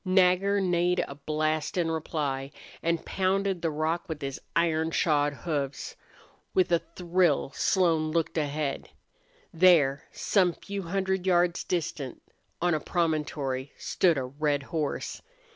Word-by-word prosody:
Nagger 190 +1 +3
neighed 180 -1 +2
a - - -7
blast 155 +3 -1
in 165 -2 +1
reply 145 -4 -2 0.3
and 170 0 0
pounded 190 -1 0
the 165 - +1
rock 160 +4 -2
with 160 -2 -4
his 135 -1 -4
iron 160 -1 +2
shod 150 -3 +2
hoofs. 145 -3 -3 0.6
With 185 -2 +3
a 170 - +4 0.2
thrill 175 -6 +2
Slone 165 -5 +2
looked 165 0 -1
ahead. 145 -2 -2 0.6
There, 160 -5 +4
some 185 -4 +2
few 200 +3 -6
hundred 190 +1 -1
yards 175 -1 +3
distant, 150 -7 -3 0.4
on 175 0 +2
a 155 - +1
promontory, 150 -6 -1
stood 170 -5 +2
a 135 - -1
red 145 +1 -1
horse. 155 -3 -2
165 Hz, 130 wpm, -28 LUFS, 150-180 Hz, 0.6 s, a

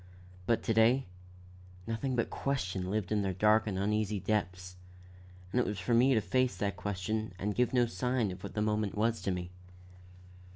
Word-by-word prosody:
But 115 - +2
to 115 - +1
day, 115 +4 +4 0.8
nothing 120 +4 -2
but 115 - 0
question 95 -9 -2
lived 105 -1 -2
in 105 -1 +2
their 95 -1 -1
dark 110 +3 +4
and 95 -3 -2
uneasy 105 +1 0
depths, 90 -2 -2 0.8
and 125 - +1
it 125 - +2
was 105 - -3
for 100 +6 -1
me 125 +3 +5
to 110 - +3
face 130 -2 +1
that 100 +1 -1
question 105 +2 -3
and 105 +3 -2
give 125 +3 +1
no 125 -2 +3
sign 115 0 -1
of 90 0 -9
what - - -8
the 105 - +1
moment 105 -1 0
was 115 +2 +1
to - - -2
me. 90 -1 -3
105 Hz, 190 wpm, -31 LUFS, 95-115 Hz, 0.8 s, me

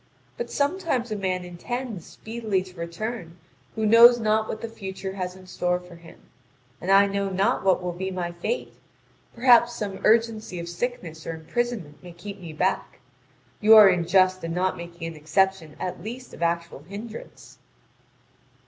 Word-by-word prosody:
But 475 - -5
sometimes 285 - -1
a - - 0
man 185 -2 -2
intends 215 +2 -5
speedily 220 -4 -3
to 185 -1 -15
return 170 +1 -5 0.4
who 220 -1 -1
knows 235 +2 +8
not 220 0 +1
what 220 - -5
the 230 - -4
future 195 -3 -6
has 185 -1 -4
in 190 0 -14
store 180 -1 -1
for 180 0 -14
him. 165 0 -15 0.6
And 185 - -4
I 195 +1 +7
know 200 0 -1
not 190 +1 +1
what 185 -1 +3
will 180 - -2
be 185 +2 -4
my 180 -2 -3
fate 175 - -3 0.6
perhaps 240 -1 +5
some 200 -4 -4
urgency 220 -4 +2
of 170 - -6
sickness 170 -4 -5
or 165 - -3
imprisonment 170 -2 -3
may 175 -1 -11
keep 200 +3 -9
me 170 -3 -8
back: 185 +5 -1 0.6
you 220 +1 +7
are 210 -2 +10
unjust 185 +1 +3
in 165 0 -3
not 185 +1 +1
making 170 0 -8
an 165 - -7
exception 160 +1 0
at 180 - -4
least 245 +4 -8
of - - -11
actual 170 -2 -1
hindrance." 205 +8 -10
190 Hz, 165 wpm, -25 LUFS, 175-220 Hz, 0.6 s, are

